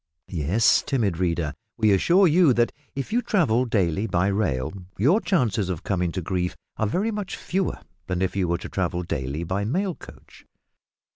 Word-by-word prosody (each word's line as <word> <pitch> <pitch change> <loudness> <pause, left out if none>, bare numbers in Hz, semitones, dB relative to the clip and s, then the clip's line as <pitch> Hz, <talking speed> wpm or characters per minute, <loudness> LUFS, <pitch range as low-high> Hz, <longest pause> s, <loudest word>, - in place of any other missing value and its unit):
Yes, 90 +7 +3
timid 105 - -1
reader, 85 -4 0 0.2
we 110 -2 +3
assure 175 - +4
you 165 -4 +5
that 120 0 +2 0.2
if 135 +8 -4
you 240 - +3
travel 155 - +2
daily 100 -3 0
by 90 +1 +1
rail 80 -8 -1 0.2
your 160 - +3
chances 115 - +1
of 90 0 -4
coming 90 -3 0
to 95 - -3
grief 90 +1 -2 0.2
are 110 - +1
very 200 - 0
much 210 -3 -4
fewer 190 0 -2 0.3
than 90 0 -1
if 95 - -1
you 95 -2 +1
were 85 0 +1
to - - -8
travel 90 -2 -1
daily 70 0 -3
by 95 +4 -2
mail 180 - 0
coach. - - -15
100 Hz, 180 wpm, -24 LUFS, 90-140 Hz, 0.3 s, you